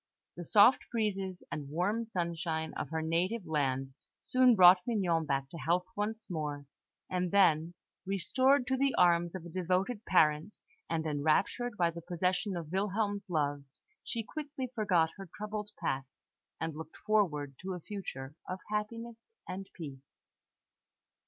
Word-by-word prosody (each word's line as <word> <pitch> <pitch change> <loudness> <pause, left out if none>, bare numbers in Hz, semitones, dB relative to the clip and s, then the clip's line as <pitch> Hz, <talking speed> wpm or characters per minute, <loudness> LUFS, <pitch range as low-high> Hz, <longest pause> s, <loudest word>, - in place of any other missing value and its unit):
The 175 - -7
soft 210 +8 +6
breezes 195 -5 -2
and 145 -2 -5
warm 205 +9 0
sunshine 170 -4 -2
of - - -4
her 160 0 -2
native 180 +6 0
land 135 -3 -1 0.3
soon 255 -2 +4
brought 180 -1 +8
Mignon 175 -9 +1
back 135 -2 0
to 165 - -7
health 170 +6 +1
once 215 +2 -3
more; 150 -4 -4 0.4
and 180 -1 -1
then, 170 -3 +4 0.3
restored 260 +8 +2
to 260 +1 0
the 275 0 +2
arms 175 0 +4
of 180 -2 -6
a - - -7
devoted 185 +6 -1
parent, 155 +2 +3 0.3
and 160 -1 -1
enraptured 160 +10 +1
by 170 -2 +3
the 170 +1 -8
possession 180 +3 -1
of 165 -2 -6
Wilhelm's 205 +1 -1
love, 145 -4 0 0.4
she 230 -2 -3
quickly 275 0 -5
forgot 180 -8 +2
her 195 -2 -9
troubled 210 0 -4
past, 135 0 -3 0.4
and 160 -1 -3
looked 160 0 -9
forward 170 -10 +1
to 190 0 -4
a - - -6
future 155 -8 -6 0.2
of 185 - -2
happiness 230 +2 -3 0.3
and 190 +1 -6
peace. 140 -6 -7
180 Hz, 145 wpm, -32 LUFS, 160-210 Hz, 0.4 s, brought